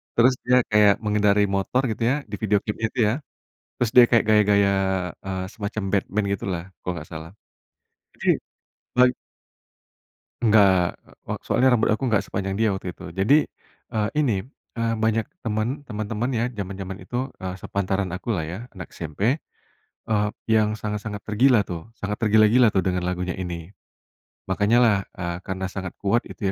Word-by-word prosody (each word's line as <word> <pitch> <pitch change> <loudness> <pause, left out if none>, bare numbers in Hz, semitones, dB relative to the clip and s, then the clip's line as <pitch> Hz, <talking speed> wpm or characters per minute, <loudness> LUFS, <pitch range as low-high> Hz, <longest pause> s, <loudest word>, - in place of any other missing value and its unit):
terus 125 +2 +5
dia 125 +1 +5
kayak 105 -1 +6
mengendarai 105 -1 +3
motor 110 +7 +1
gitu 110 - -6
ya, - - +2 0.2
di - - -2
video 105 -1 +2
klipnya 110 +1 -2
itu - - -6
ya, 110 - +2 0.6
terus 120 -3 0
dia 125 - +11
kayak 115 -2 +4
gaya-gaya, 105 -2 +4 0.6
eee, 95 -1 -3
semacam 105 0 -4
Batman 100 +1 0
gitu 100 - -3
lah, 85 -1 -3 0.2
kalau 90 - -3
nggak 75 - -8
salah. 80 +1 -7 0.8
Jadi, - - -7 0.7
bag 125 0 +6 1.3
Enggak, 100 -5 +4 0.2
wa - - -4
soalnya 130 +1 +3
rambut 115 -2 +3
aku 110 +5 0
nggak 105 - +2
sepanjang 95 0 -2
dia 110 - +4
waktu 90 -2 -5
itu. - - -10
Jadi, 95 - +3 0.5
eee, 110 -1 -1
ini, 110 -9 +1 0.3
eee, 115 0 0
banyak 110 0 +2 0.2
teman 115 +5 -2
teman-teman 110 +2 -3
ya 115 - +1
jaman-jaman 95 -2 -6
itu, 130 +2 -4
eee, 95 -1 -4
sepantaran 95 +1 -2
aku 100 +4 -2
lah 80 - -2
ya, 85 +5 -5 0.2
anak 90 - -9
SMP, 100 - -1 0.7
eee, 105 -1 +2 0.2
yang 110 -1 +3
sangat-sangat 105 -1 -4
tergila 115 +1 +3
tuh, 90 +4 -7
sangat 105 -2 -4
tergila-gila 110 +1 +4
tuh 95 - +3
dengan 90 0 -1
lagunya 90 0 -2
ini. 85 -2 -5 0.8
Makanya 100 +4 +2
lah, 110 -4 +4 0.2
eee, 85 -1 -3
karena 95 0 -5
sangat 95 -3 -6
kuat 105 +4 +1
itu 105 - -8
105 Hz, 160 wpm, -24 LUFS, 95-110 Hz, 1.3 s, dia